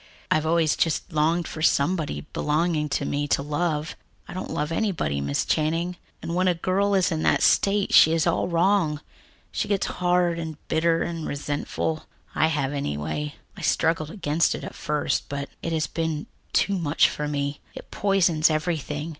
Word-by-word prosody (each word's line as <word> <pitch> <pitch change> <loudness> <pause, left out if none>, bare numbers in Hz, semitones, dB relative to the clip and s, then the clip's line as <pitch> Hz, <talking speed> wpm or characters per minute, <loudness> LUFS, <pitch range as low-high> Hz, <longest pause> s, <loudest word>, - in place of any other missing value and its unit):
"I've 155 0 +2
always 165 -2 +3
just 165 +2 -1
longed 160 +3 +1
for 155 - -7
somebody 160 +1 +1
belonging 155 0 0
to - - -1
me 145 0 -1
to 140 - +1
love. 150 +1 -1 0.3
I - - -8
don't 185 - -5
love 150 +2 -2
anybody, 165 - -1
Miss 70 0 -1
Channing, 165 +3 0 0.3
and 165 - -3
when 185 +1 +2
a 180 - +3
girl 195 +4 +1
is 185 -1 +2
in 160 -1 -1
that - - +2
state, 200 0 +3
she 160 - +8
is 165 -1 +2
all - - +1
wrong. 170 -3 +2 0.5
She - - -2
gets 200 -2 +1
hard 175 -1 +1
and 160 -2 -5
bitter 165 +1 +2
and 165 -2 -4
resentful 145 +2 -3 0.3
I 160 - +3
have, 145 -3 -1
anyway. 75 - -3 0.2
I - - -10
struggled 160 -2 +1
against 165 -4 +1
it - - -7
at - - -7
first, 150 0 -1
but 140 0 -4
it 165 - -3
has 160 -1 +1
been 160 -2 -3 0.3
too 200 -2 +2
much 155 -2 +3
for 150 - -3
me. 145 0 -2 0.2
It - - -10
poisons 175 -6 +3
everything. 155 -1 -2
160 Hz, 175 wpm, -25 LUFS, 150-175 Hz, 0.5 s, she